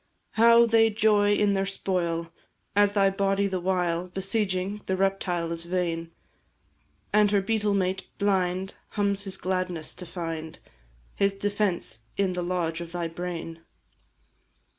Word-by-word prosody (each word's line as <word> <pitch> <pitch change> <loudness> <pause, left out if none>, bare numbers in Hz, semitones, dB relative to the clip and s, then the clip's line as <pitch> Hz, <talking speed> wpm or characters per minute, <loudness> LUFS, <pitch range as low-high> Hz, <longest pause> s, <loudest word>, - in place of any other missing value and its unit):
How 235 +1 +6
they 225 -1 +4
joy 210 -1 +3
in 205 -1 +2
their 195 0 0
spoil, 170 -4 -2 0.4
as 205 0 +4
thy 195 -1 +4
body 195 0 +1
the 190 -2 -1
while 180 -1 0
Besieging, 195 +1 -1
the 190 - 0
reptile 185 -3 0
is 165 0 -4
vain, 170 -2 -2 1.0
And 210 0 +5
her 200 0 +3
beetle 210 0 +1
mate 190 0 -1
blind 190 -2 0 0.2
hums 200 0 +1
his 195 - -2
gladness 180 -3 -2
to 180 -1 -8
find 165 -2 -5 0.6
His 200 0 +1
defence 195 - -1 0.2
in 195 -2 +1
the 180 - -2
lodge 175 -2 -1
of 170 0 -8
thy 175 -1 -2
brain! 165 -1 -5
190 Hz, 140 wpm, -27 LUFS, 175-200 Hz, 1.0 s, How